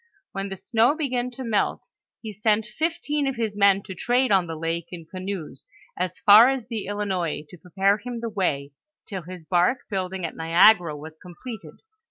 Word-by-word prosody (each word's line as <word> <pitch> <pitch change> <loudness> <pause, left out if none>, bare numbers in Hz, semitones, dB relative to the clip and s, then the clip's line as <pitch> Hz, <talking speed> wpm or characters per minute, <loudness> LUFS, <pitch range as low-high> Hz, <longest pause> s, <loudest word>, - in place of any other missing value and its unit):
When 195 0 -4
the 195 - -6
snow 235 +7 +2
began 255 -5 -2
to 250 +1 -8
melt, 220 -4 -1 0.4
he 220 -1 -6
seni 215 +1 +1
fifteen 295 +4 -2
of 270 - -1
his 225 -3 -2
men 200 -1 +4
to 190 - -8
trade 245 +7 +1
on 190 -3 +3
the 165 - -5
lake 165 +1 -3
in 170 -2 -9
canoes, 185 -6 -7 0.3
as 180 0 -3
far 215 +4 +8
as 265 -4 -2
the 225 -4 -5
Hinois 185 -7 -2
to 180 - -12
prepare 195 +4 +1
him 240 +2 -6
the 230 - -4
way, 145 -9 -1 0.4
till 195 -4 -4
his 175 0 -10
barque 180 +9 +1
building 190 -2 -3
at 165 - -6
Niagara 170 0 +4
was 155 +2 -11
completed. 180 - -10
195 Hz, 185 wpm, -24 LUFS, 175-230 Hz, 0.4 s, far